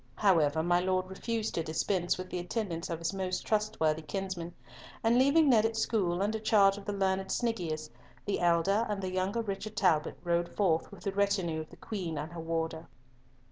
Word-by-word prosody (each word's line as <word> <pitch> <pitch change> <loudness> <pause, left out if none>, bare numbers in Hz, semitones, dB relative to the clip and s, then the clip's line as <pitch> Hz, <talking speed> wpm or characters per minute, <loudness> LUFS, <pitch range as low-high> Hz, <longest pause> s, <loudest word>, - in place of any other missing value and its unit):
However, 160 -6 +3
my 175 +1 +3
Lord 185 0 0
refused 225 +3 -2
to 165 - -1
dispense 175 +3 0
with 185 0 -7
the 180 - -2
attendance 180 -2 -3
of 165 - -2
his 165 +3 -2
most 185 -1 -2
trustworthy 210 -8 +1
kinsman, 180 0 -5 0.5
and 225 +1 +4
leaving 285 +4 +5
Ned 230 -5 +5
at 225 0 0
school 195 -5 +1
under 220 +2 -1
charge 205 -2 +4
of 205 - -10
the 205 - -2
learned 190 -1 0
Sniggius, 170 -10 -1 0.4
the 200 - -1
elder 175 +6 +2
and 205 -1 -1
the 185 -1 -4
younger 190 +5 0
Richard 210 +1 -5
Talbot 165 -6 +2
rode 170 0 +1
forth 170 -6 +1
with - - -12
the 195 - -1
retinue 190 -5 0
of 155 - -10
the - - -13
Queen 180 -7 -4
and 150 +3 -4
her 170 -1 -6
warder. 165 0 -3
185 Hz, 190 wpm, -31 LUFS, 170-210 Hz, 0.5 s, leaving